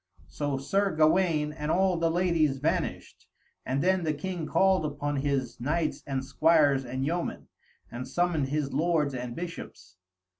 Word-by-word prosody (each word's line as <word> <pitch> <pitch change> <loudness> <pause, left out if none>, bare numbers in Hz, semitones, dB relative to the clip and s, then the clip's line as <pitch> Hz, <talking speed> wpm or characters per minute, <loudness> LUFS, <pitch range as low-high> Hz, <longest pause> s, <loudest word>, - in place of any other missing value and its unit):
So 145 -2 -2
Sir 195 +6 0
Gawaine 155 -1 +3
and 150 -1 -5
all 190 +2 +3
the 165 0 +1
ladies 165 -5 +1
vanished, - - -3 0.4
and 135 +2 0
then 185 0 +2
the 155 -2 0
king 170 +1 -4
called 190 -1 +3
upon 145 -1 -2
his 135 -4 -1
knights 155 +4 -1
and 135 -1 -2
squires 145 -3 +3
and 130 +2 -3
yeomen, 170 +3 -3 0.4
and 125 +2 -6
summoned 175 -5 0
his 145 0 -2
lords 155 -1 +1
and 125 -2 -5
bishops. 95 - -8
150 Hz, 150 wpm, -28 LUFS, 135-170 Hz, 0.4 s, Gawaine